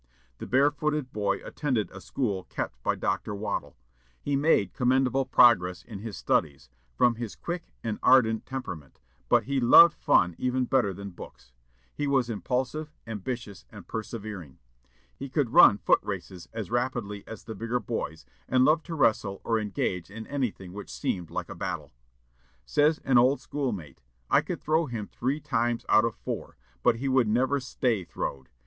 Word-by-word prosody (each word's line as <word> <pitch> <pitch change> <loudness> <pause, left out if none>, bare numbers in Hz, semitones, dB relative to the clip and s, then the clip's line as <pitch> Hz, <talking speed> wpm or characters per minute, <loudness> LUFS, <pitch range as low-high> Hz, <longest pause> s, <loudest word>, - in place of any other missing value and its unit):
The - - -6
barefooted 145 +1 +1
boy 100 -2 -1
attended 130 -8 -2
a 95 - -10
school 100 -8 -2
kept 60 - -5
by - - 0
Dr. 105 - -2
Waddell. 105 +2 -4 0.4
He 140 - -1
made 135 - +2
commendable 130 +1 +2
progress 90 -8 +5
in 110 -5 -9
his 110 0 -7
studies, 70 -5 -1 0.2
from 120 - +3
his 115 -4 -5
quick 175 0 -6
and 110 -2 -3
ardent 115 -4 +4
temperament, 95 - -7 0.3
but 120 -2 +4
he 135 +4 -1
loved 130 +7 +8
fun 85 0 +3
even 130 0 0
better 120 -6 +2
than 100 +1 -8
books. 65 -7 -13 0.4
He 145 - -2
was 130 -4 +1
impulsive, 130 - -2
ambitious, 110 -2 -6
and - - -12
persevering. 105 - -6 0.6
He 140 - -7
could 130 -4 0
run 100 - +8
foot - - +3
races 95 -3 -6
as 110 -5 -6
rapidly 120 -5 -2
as 110 - -9
the 110 - -7
bigger 115 +4 -2
boys, 80 - -5 0.2
and 130 0 +4
loved 155 +3 +3
to 165 - -4
wrestle 110 -8 +1
or 115 -1 +1
engage 95 -4 -2
in 110 +2 -8
anything 115 -10 -3
which 105 +1 -8
seemed 90 -4 -3
like - - -4
a - - -7
battle. - - -5 0.7
Says 150 - +3
an 130 -2 +5
old 130 +4 +4
schoolmate, 100 - -4 0.3
"I - - +6
could - - -5
throw 155 +1 +2
him 115 -5 -4
three 130 +8 -2
times 120 -3 -1
out 110 - +5
of 115 - -2
four, - - -6 0.2
but 115 - +4
he 130 +4 -3
would 130 -3 +3
never 130 +6 +2
stay 120 -5 -1
throwed. 65 -5 -5
115 Hz, 165 wpm, -27 LUFS, 100-130 Hz, 0.7 s, loved